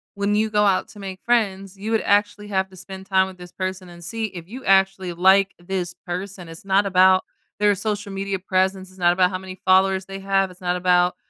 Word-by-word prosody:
when 200 +1 0
you 220 +1 +1
go 210 -1 +2
out 195 -2 +2
to 210 - -14
make 190 -1 -7
friends, 195 -5 0
you 200 +3 -6
would 225 - +2
actually 205 0 +1
have 190 -1 0
to 190 - -16
spend 190 +1 -10
time 190 -1 +3
with 190 -1 -11
this 180 -1 -11
person 185 0 -5
and 175 0 -13
see 225 +6 -3
if 180 -5 -8
you 255 +6 -9
actually 190 -1 +3
like 190 +3 +4
this 175 0 -4
person, 180 0 -6
it's 165 +3 -11
not 195 +1 +3
about 185 -1 +5 0.4
their 205 0 +4
social 205 0 -3
media 195 0 -3
presence, 190 0 -1
it's 185 0 -18
not 175 -1 +4
about 180 +1 +3
how 185 - -3
many 185 0 -9
followers 190 0 +3
they 195 0 -7
have, 195 -1 +1
it's 180 - -17
not 180 0 0
about 180 0 +2
190 Hz, 230 wpm, -22 LUFS, 185-200 Hz, 0.4 s, about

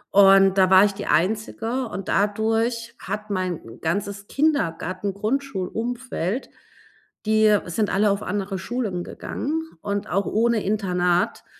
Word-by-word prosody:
Und 195 -1 +6
da 185 - +5
war 190 +2 +7
ich 200 - 0
die - - -7
Einzige 225 +5 0
und 195 -3 -6
dadurch 225 +3 0
hat 210 0 -5
mein 180 -11 -4
ganzes 200 +4 -2
Kindergartengrundschulumfeld 225 - -2 0.8
die 215 -1 +4
sind 210 +5 -1
alle 205 +1 +3
auf 200 - -1
andere 195 -1 -3
Schulen 200 -4 -3
gegangen 320 +3 -4 0.2
und 200 0 -3
auch 195 +2 0
ohne 230 0 +1
Internat, 180 -4 0
205 Hz, 120 wpm, -23 LUFS, 190-225 Hz, 0.8 s, war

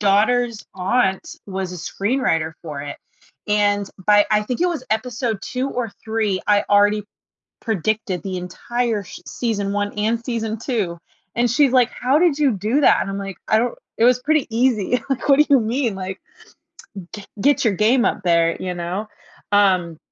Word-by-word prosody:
daughter's 220 +3 +2
aunt 190 +1 0 0.2
was 190 -2 -4
a - - -6
screenwriter 175 -4 -1
for 150 -4 -6
it, 145 - -6 0.5
and 205 -1 +2 0.2
by 205 0 +5
I 210 0 +3
think 250 +8 -4
it 360 - +3
was 330 -7 -3
episode 225 -1 -1
2 260 +2 -2
or 240 -4 -3
3, 220 -4 -1
I 205 -1 +3
already 205 0 +3 0.6
predicted 215 -3 -1
the 190 -2 -4
entire 220 +4 -2
sh 170 - -11
season 205 -4 -2
1 205 0 -1
and 225 +3 0
season 225 -2 -2
2, 210 -10 -2 0.4
and 240 +1 +2
she's, 270 +3 +3
like, 250 -2 +4
"How 265 +4 +1
did 335 -4 +3
you 285 -4 +4
do 215 +9 0
that?" - - +5
And, 195 - -3
I'm, 195 - -4
like, 195 -2 -6
"I 220 - +4
don't 245 +1 -1 0.2
it 230 - +4
was 250 0 +4
pretty 310 -1 +2
easy, 245 -1 +2
like, 270 - -2
what 275 - +6
do 300 - +6
you 270 - +7
mean, 235 0 -1
like 190 0 -5 1.0
gre 210 - -7 0.2
get 285 +3 +3
your 225 - +3
game 235 +5 +3
up 215 - 0
there, 170 -1 +3
you 180 -1 -3
know," 180 +5 -4 0.4
um 185 -5 +3
215 Hz, 180 wpm, -21 LUFS, 195-245 Hz, 1.0 s, you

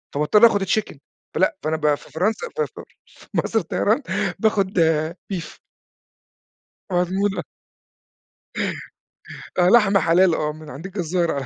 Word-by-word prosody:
فباضطَر 180 +10 +5
آخُد 205 -3 0
chicken، 200 -5 -1 0.4
فلأ - - +2
فأنا 160 +1 0
ب 150 -1 +2
في - - -16
فرنسا 215 - -1
في 465 - 0
في - - -11 0.5
مصر - - 0
للطيران - - 0 0.4
باخُد 200 -4 +1 0.5
beef. 170 -3 -6 1.3
مضمونة. 190 +3 0 2.1
آه، 180 0 +4
لحمة 210 -4 +5
حلال، 170 +1 +4
آه، 150 0 -1
من 155 -1 -12
عند 150 +7 -9
الجزار 180 -3 -1
على 140 -2 -3
180 Hz, 120 wpm, -22 LUFS, 160-205 Hz, 2.1 s, فباضطَر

